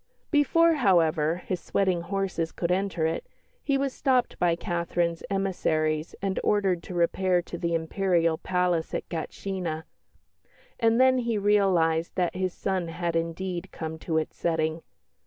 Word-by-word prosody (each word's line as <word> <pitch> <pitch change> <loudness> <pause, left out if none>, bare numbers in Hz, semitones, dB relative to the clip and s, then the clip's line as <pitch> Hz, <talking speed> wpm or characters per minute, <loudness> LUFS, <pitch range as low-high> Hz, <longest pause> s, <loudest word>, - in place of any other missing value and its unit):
Before, 330 +3 +4
however, 170 - +2
his 185 - -2
sweating 185 -2 0
horses 185 -2 -2
could 170 0 -2
enter 185 -3 0
it, 160 +1 -2 0.4
he 275 -2 +1
was 275 -1 -1
stopped 255 -3 +1
by 175 -1 +3
Catherine's 170 -1 -1
emissaries 160 -5 0
and 195 -1 0
ordered 195 -4 +2
to 180 - -8
repair 180 +1 +2
to 175 - -8
the 170 -1 -1
Imperial 165 -1 +1
Palace 180 -3 0
at - - -4
Gatshina. 170 -1 -4 1.0
And 230 0 +3
then 260 0 +5
he 235 -3 0
realised 185 -6 +2
that 180 -2 0
his 185 0 -1
sun 185 -1 -2
had 170 0 -3
indeed 175 +2 -3
come 160 -1 -6
to 160 0 -1
its 160 - -2
setting. 160 -1 -1
180 Hz, 145 wpm, -27 LUFS, 165-195 Hz, 1.0 s, then